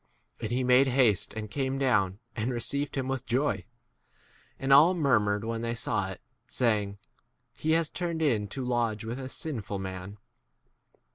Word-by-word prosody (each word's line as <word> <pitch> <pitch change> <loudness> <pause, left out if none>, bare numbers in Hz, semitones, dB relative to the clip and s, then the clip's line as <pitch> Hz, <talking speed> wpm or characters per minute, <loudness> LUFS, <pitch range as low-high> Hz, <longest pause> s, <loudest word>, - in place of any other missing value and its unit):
And 110 - -3
he 125 +2 0
made 125 +2 +5
haste 120 -8 +2
and 110 -1 -5
came 135 +1 -1
down, 105 -9 +2 0.2
and 115 +2 -1
received 140 +4 -1
7 135 - 0
him 130 - -5
with 135 -2 -3
joy. 120 -6 0 0.9
And 135 0 +2
all 160 +7 +7
murmured 105 - +2
when 115 0 -2
they 115 0 -2
saw 100 -4 -1
[it], 95 - -7 0.3
saying, 105 -4 0 0.6
He 160 +1 0
has 165 -1 +3
turned 170 -1 -3
in 110 -9 +2
to 130 +5 -5
lodge 115 -3 0
with 115 +4 -4
a 130 -1 -6
sinful 130 - -4
8 - - -6
man. 95 +1 -6
120 Hz, 170 wpm, -29 LUFS, 105-135 Hz, 0.9 s, all